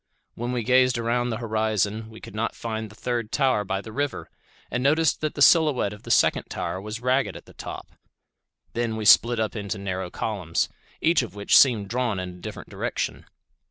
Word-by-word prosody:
When 120 +2 -4
we 125 -2 -1
gazed 125 0 +4
around 120 +1 0
the 115 - -2
horizon, 110 -1 -1
we 110 0 -12
could - - -11
not 110 +2 -2
find 110 -1 -4
the 105 - -15
third 120 -2 -3
tower 130 -7 +2
by 95 0 -2
the 110 - -10
river, 145 +4 -3 0.4
and 125 - -1
noticed 155 +3 +2
that 155 -1 -2
the 145 - +4
silhouette 150 - +4
of 105 - -12
the - - -11
second - - +3
tower 85 +2 -4
was 105 +3 -6
ragged 130 +2 +1
at - - -14
the - - -16
top. - - -8 0.8
Then 115 -1 -1
we 110 -1 -4
split 115 +2 +6
up 110 0 -1
into 105 0 -3
narrow 95 -2 -4
columns, 90 -5 -2 0.3
each 165 -1 +4
of 120 -4 -7
which 100 0 +2
seemed 115 -7 +6
drawn 120 -4 -1
in 90 0 -4
a 90 0 -12
different - - -8
direction. - - -3
115 Hz, 200 wpm, -25 LUFS, 105-125 Hz, 0.8 s, split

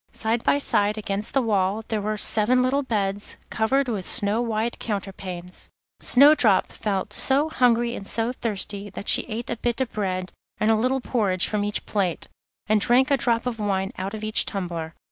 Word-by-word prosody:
Side 225 +1 -1
by - - +3
side 210 -6 +1
against 205 0 -3
the 270 - +3
wall 205 -1 0
there 220 -2 -1
were 215 +1 -2
seven 225 +4 +3
little 270 +3 +1
beds, 205 -6 -2 0.2
covered 260 +5 +1
with 210 -6 -2
snow 205 +5 +1
white 230 0 -2
counterpanes. 185 -4 -6 0.3
Snowdrop 260 -7 +5
felt 195 -3 -3
so 280 +4 +2
hungry 240 -4 +2
and 195 - -6
so 230 +1 0
thirsty 205 -3 -3
that 200 +1 -9
she - - +4
ate 230 0 -5
a 235 - -2
bit 240 +2 -2
of 260 -3 -1
bread 185 -3 -3 0.3
and 215 +1 +3
a - - +4
little 255 +4 0
porridge 200 -8 0
from 210 -1 -1
each 205 0 -1
plate, 190 -5 -1 0.4
and 215 -1 +2
drank 250 +5 +3
a - - +6
drop 235 -2 0
of 240 -3 -3
wine 195 -2 -1
out 195 +3 -4
of 215 - -8
each 215 0 +4
tumbler. 170 -4 -4
215 Hz, 185 wpm, -24 LUFS, 200-240 Hz, 0.4 s, a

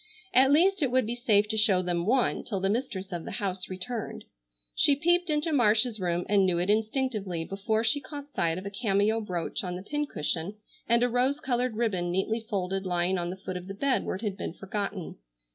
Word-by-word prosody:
At 265 +2 +6
least 370 +6 +4
it 275 - +2
would 255 -1 +2
be 230 - -2
safe 215 -4 +2
to 220 - 0
show 200 -4 +4
them 175 0 -1
one 250 +2 +2
till 200 -4 -3
the 195 +1 +1
mistress 210 -5 -3
of 175 -2 -4
the - - -7
house 190 -4 -3
returned. 210 +5 -5 0.5
She 280 - +5
peeped 345 +4 +2
into 305 +1 +1
Marcia's 225 -2 +3
room, 175 -1 -1
and 200 0 +3
knew 180 -2 +2
it 180 +4 +2
instinctively 215 -6 -1
before 205 +4 -1
she 235 +5 +3
caught 285 +1 -9
sight 165 0 +1
of 185 - -7
a 200 - -5
cameo 210 +1 +1
brooch 180 -4 -3
on 180 -1 -4
the 185 - -7
pin 295 +6 -2
cushion, 165 - -3 0.3
and 235 +1 +4
a - - +4
rose 250 +4 +1
colored 250 -4 -1
ribbon 200 -6 -1
neatly 195 +6 0
folded 195 -3 -3
lying 180 0 0
on 175 0 -2
the 180 - -4
foot 190 -1 -6
of 180 0 -9
the 195 - -6
bed 275 +5 +1
where - - -3
it 190 - -8
had 200 -3 -2
been 165 - -5
forgotten. 195 -1 -5
210 Hz, 220 wpm, -28 LUFS, 185-245 Hz, 0.5 s, At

